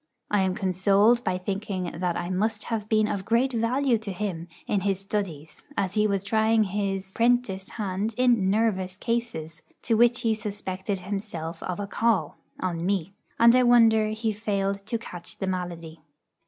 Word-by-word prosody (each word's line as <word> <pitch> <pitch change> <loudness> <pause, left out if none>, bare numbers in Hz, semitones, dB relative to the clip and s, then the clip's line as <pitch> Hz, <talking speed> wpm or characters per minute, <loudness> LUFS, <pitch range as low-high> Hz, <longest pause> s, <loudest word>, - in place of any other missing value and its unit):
I 205 -1 +3
am 190 -1 +1
consoled 200 +4 +3
by 180 - 0
thinking 195 0 -3
that 175 +1 -1
I 175 +1 -3
must 210 +3 -1
have 215 -2 -3
been 215 -1 +3
of 200 -2 -2
great 235 +5 +2
value 240 +2 +1
to 215 -2 -5
him 180 -3 -4 0.2
in 205 - +1
his 195 0 0
studies, 185 -7 -4 0.2
as 190 -2 0
he 210 0 +3
was 200 -2 -1
trying 220 +1 +3
his 195 -1 -3
'prentice 230 -5 +1
hand 205 +1 -3
in 240 -6 +3
'nervous' 190 -3 0
cases, 215 -10 -3 0.2
to 230 - +1
which 240 +2 +4
he 225 -1 +2
suspected 200 -2 -4
himself 185 -4 -5
of 180 0 -4
a 205 - -2
call, 225 +1 0 0.2
on 170 -3 -2
me; 190 -1 -1 0.3
and 235 +1 +7
I 255 - +5
wonder 230 -3 +5
he 220 +1 -1
failed 200 -2 -2
to 230 - -1
catch 180 -6 -9
the 195 - -3
malady. 170 -3 -4
200 Hz, 170 wpm, -26 LUFS, 185-225 Hz, 0.3 s, and